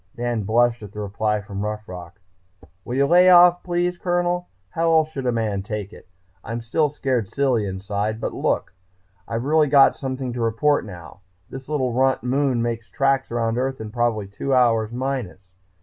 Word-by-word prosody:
Dan 120 -3 -2
blushed 120 +2 +2
at 105 -1 -10
the 105 - -7
reply 105 +1 -1
from 100 -1 -7
Rough 105 0 -4
Rock. 90 +2 -10 0.6
"Will 125 - -5
you 140 +1 +3
lay 180 +4 +6
off 175 0 +7
please, 175 0 -1
Colonel? 175 0 -1 0.2
How 165 0 0
else 160 -1 +3
should 135 -4 -5
a - - +3
man 110 -4 -1
take 105 0 -6
it? - - -15 0.4
I'm 115 +1 -5
still 150 +7 0
scared 130 -7 -2
silly 130 -7 0
inside. 100 +3 -3
But, - - -3
look, - - -1 0.5
I've 115 +2 -3
really 155 +1 +3
got 140 -1 +5
something 130 -2 -4
to 120 - -4
report 115 +6 +1
now. 90 -2 -11 0.3
This 135 +1 -9
little 130 -5 -1
runt 130 -1 +1
moon 130 -1 +1
makes 115 -2 -4
tracks 135 -2 0
around 115 0 -1
Earth 130 +1 -2
in 110 -1 -7
probably 120 -3 0
two 130 +7 -2
hours 115 -3 +2
minus. 120 -8 -5
120 Hz, 180 wpm, -22 LUFS, 105-140 Hz, 0.6 s, off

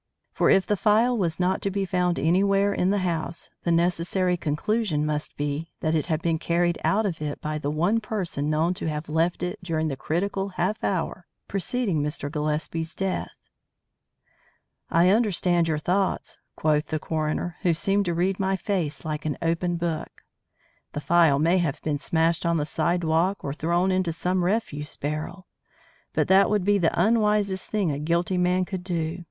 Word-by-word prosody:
For - - +2
if 190 - +5
the 210 - +1
phial 220 +5 +3
was 175 -7 -1
not 185 +1 +1
to 200 - 0
be 195 0 -1
found 180 -1 0
anywhere 195 +7 +3
in 180 - +1
the 205 - +2
house, 165 -2 -3
the 170 - 0
necessary 180 +2 +1
conclusion 165 +1 0
must 150 0 -3
be 145 +3 -2
that 155 - 0
it 160 0 0
had 160 -2 -1
been 165 -2 +1
carried 170 0 +1
out 215 +2 +2
of 170 -6 -3
it 150 -1 -3
by 155 0 -3
the 145 - -2
one 175 +9 +1
person 185 -9 -2
known 160 +3 +2
to 170 - -3
have 150 0 -4
left 165 +3 0
it 180 +4 -3
during 160 -3 -1
the 135 - -3
critical 195 +8 -2
half 195 +5 -1
hour 185 -1 -2 0.2
preceding 195 -3 -1
Mr. 145 -1 -3
Gillespie's 155 +2 -2
death. 195 -1 -3 1.5
"I 170 +2 +4
understand 185 -5 +2
your 155 -2 0
thoughts," 185 +5 -1 0.2
quoth 150 0 +1
the 155 - -1
coroner, 155 +2 -2
who 175 - +3
seemed 200 +4 +1
to 170 -1 -1
read 185 +3 0
my 195 0 +1
face 175 -6 -2
like 155 0 -3
an 150 - -2
open 170 +1 0
book. 165 -2 -4 0.7
"The 145 - -3
phial 165 -3 +4
may 170 +5 +3
have 155 -4 -1
been 150 -2 -1
smashed 165 +3 +1
on 170 -1 +1
the 150 - 0
sidewalk 170 +3 0
or 140 - -3
thrown 170 +4 +1
into 185 -2 +1
some 180 +2 0
refuse 175 -7 -2
barrel. 155 +6 -4 0.7
But - - +1
that 190 +1 +5
would 205 -3 +1
be 205 0 +3
the 170 -2 +1
unwisest 210 -1 +2
thing 200 -7 0
a 140 - -3
guilty 170 +4 0
man 180 +1 +2
could 185 -1 -5
do. 170 -1 -2
175 Hz, 180 wpm, -25 LUFS, 155-190 Hz, 1.5 s, if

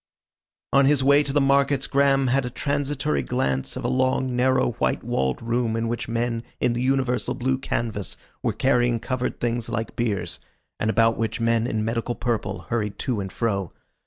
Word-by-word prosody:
On 140 0 +6
his 140 -1 +3
way 140 +2 +6
to 140 - -1
the 145 - +3
markets 140 0 +3
Graham 135 -1 +3
had 130 +2 +2
a 125 - -3
transitory 140 - -1
glance 65 +1 -1
of 130 - -5
a - - +2
long 130 0 +1
narrow 130 0 +3
white - - +1
walled 65 -1 0
room 115 -1 0
in 115 0 -1
which 120 +1 -3
men 115 0 -1 0.2
in 120 - +2
the 120 - -2
universal 130 -1 0
blue 130 +1 0
canvas 110 -6 -3 0.2
were - - +1
carrying 120 -3 +2
covered 130 +1 -3
things 120 -1 -1
like 115 -1 -3
biers, 110 -4 -2 0.4
and 110 - 0
about 115 0 +3
which 115 +1 -2
men 115 0 +2
in 110 -2 -1
medical 115 +1 -2
purple 120 -2 -2
hurried 105 -3 -1
to 120 -5 -1
and 95 -1 -5
fro. 100 -6 -1
120 Hz, 185 wpm, -24 LUFS, 115-130 Hz, 0.4 s, On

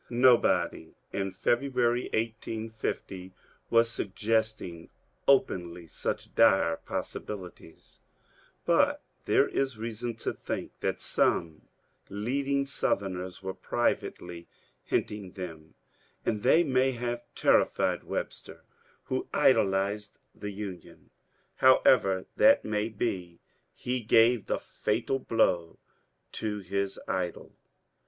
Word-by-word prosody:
Nobody 120 -9 +3 0.2
in 95 -1 -1
February, 120 +4 +1
1850, 110 -4 -4 0.4
was 115 0 +5
suggesting 110 -5 -2 0.4
openly 90 -10 +2
such 80 - -4
dire 85 -7 +4
possibilities, 90 -5 -7 0.6
but - - +3 0.2
there - - +4
is 135 -4 -1
reason 115 +1 -4
to - - -3
think - - -5
that - - -1
some 80 -2 0 0.4
leading 140 +7 -1
Southerners 95 -8 -2
were 95 0 -3
privately 85 -2 -2 0.4
hinting 100 -3 -2
them, 80 -4 -8 0.5
and 105 -2 0
they 165 +10 +5
may 130 -3 +2
have 120 0 -3
terrified - - +2
Webster, - - -6 0.4
who - - -3
idolized 100 +2 +2 0.2
the 105 - -6
Union. 100 -3 -8 0.5
However 100 -7 +5
that 280 +1 +6
may 105 +1 -1
be, 95 -6 -3 0.4
he 125 0 -2
gave 115 0 +4
the - - 0
fatal 135 - -2
blow 90 -9 +1 0.5
to 105 -1 -3
his 100 +1 -2
idol. 90 -2 -3
105 Hz, 100 wpm, -29 LUFS, 95-120 Hz, 0.6 s, that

